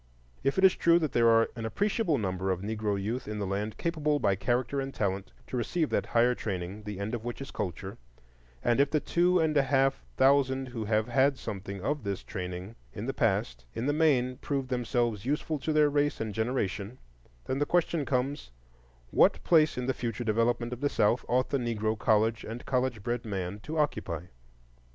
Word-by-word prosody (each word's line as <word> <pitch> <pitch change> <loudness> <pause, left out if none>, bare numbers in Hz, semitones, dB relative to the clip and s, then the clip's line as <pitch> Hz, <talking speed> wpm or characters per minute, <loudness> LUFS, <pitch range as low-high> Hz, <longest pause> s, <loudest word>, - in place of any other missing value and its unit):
If 135 - +1
it 190 - +2
is 190 - +7
true 170 0 +4
that 155 -4 0
there 115 -1 +4
are 115 0 +4
an 115 - -5
appreciable 200 - 0
number 95 -3 -2
of 90 -1 0
Negro 105 -1 -1
youth 115 +6 -3
in 105 0 -4
the 105 - -2
land 100 +3 -3
capable 150 -3 0
by 100 - +2
character 125 +6 0
and 135 0 -4
talent 100 -4 -2
to - - -6
receive 155 +7 -1
that - - 0
higher 120 +1 +3
training, 95 -2 -4
the 105 -2 -5
end 100 +3 -3
of 115 -2 -3
which 120 0 -5
is 135 - -7
culture, 90 -4 -5 0.6
and 120 +2 +2
if 140 0 +4
the 155 - +2
two 175 +4 +2
and 160 -2 +1
a 140 - +6
half 135 0 +1
thousand 135 -1 +3
who 115 -3 -4
have 110 0 +1
had 135 +3 +3
something 100 -4 -6
of 145 +5 -1
this 100 -2 -3
training 90 +1 -6 0.2
in - - -5
the - - -2
past - - 0
have - - -8
in 115 - -1
the 145 - +2
main 130 -5 +2
proved 135 -3 -3
themselves 120 -4 0
useful 150 +3 -1
to 155 +4 -2
their 150 -1 +5
race 145 0 +1
and 110 -2 -3
generation, 110 -1 -2 0.5
the 135 +2 0
question 170 +1 +1
then 145 - -2
comes, 135 - -1 0.6
What - - +4
place 155 -5 +4
in 125 - -2
the 130 - +1
future 120 -2 -3
development 120 +2 +1
of 125 - -8
the 145 - +2
South 115 +1 +2
ought 125 +1 +1
the 140 - +1
Negro 110 -2 -1
college 110 0 +2
and 115 +2 -7
college 125 -5 -1
bred 120 +1 -2
man 100 -2 -4
to 155 +9 -6
occupy? 90 - -1
120 Hz, 205 wpm, -29 LUFS, 105-140 Hz, 0.6 s, is